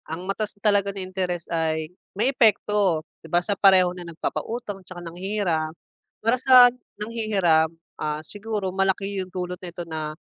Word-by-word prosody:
Ang 165 Hz, +3 st, -5 dB
mataas 205 Hz, +2 st, -3 dB
talaga 200 Hz, -1 st, +2 dB
na 200 Hz, -1 st, -5 dB
interes 185 Hz, -2 st, -3 dB
ay 160 Hz, 0 st, -1 dB, 0.2 s
may 245 Hz, +6 st, +3 dB
epekto 205 Hz, -, +3 dB, 0.2 s
di 160 Hz, -, -13 dB
ba, 175 Hz, -, +3 dB
sa 205 Hz, -, +1 dB
pareho 190 Hz, -3 st, +5 dB
na 180 Hz, -, -8 dB
nagpapautang 205 Hz, +5 st, -4 dB
tsaka 185 Hz, 0 st, -11 dB
nanghihiram. 175 Hz, -2 st, -1 dB, 0.6 s
Para 230 Hz, +3 st, +3 dB
sa 250 Hz, -2 st, +8 dB, 0.2 s
nanghihiram, 205 Hz, -8 st, +1 dB, 0.3 s
ah, 150 Hz, 0 st, -2 dB
siguro 205 Hz, -1 st, -4 dB
malaki 195 Hz, +1 st, 0 dB
'yung 185 Hz, -, -6 dB
dulot 180 Hz, -1 st, -5 dB
nito 175 Hz, -1 st, -6 dB
na, 155 Hz, -1 st, -5 dB
190 Hz, 150 wpm, -24 LUFS, 170-210 Hz, 0.6 s, sa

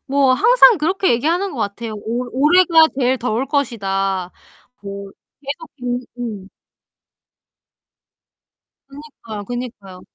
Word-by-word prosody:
뭐 275 Hz, -1 st, +3 dB
항상 475 Hz, -, +6 dB
그렇게 370 Hz, +5 st, +1 dB
얘기하는 340 Hz, +10 st, 0 dB
것 260 Hz, -, -8 dB
같아요. 215 Hz, +2 st, -4 dB
오 230 Hz, +4 st, -4 dB
"올해가 325 Hz, +2 st, +5 dB
제일 255 Hz, 0 st, +1 dB
더울 250 Hz, +2 st, -1 dB
것이다." 195 Hz, -, -1 dB, 0.5 s
뭐 200 Hz, 0 st, -7 dB, 0.3 s
계속 290 Hz, +3 st, -7 dB, 0.5 s
음음. 210 Hz, -5 st, -6 dB, 2.4 s
그니까요, 275 Hz, -7 st, -10 dB
그니까요. 215 Hz, -6 st, -7 dB
250 Hz, 225 characters per minute, -19 LUFS, 205-300 Hz, 2.4 s, 항상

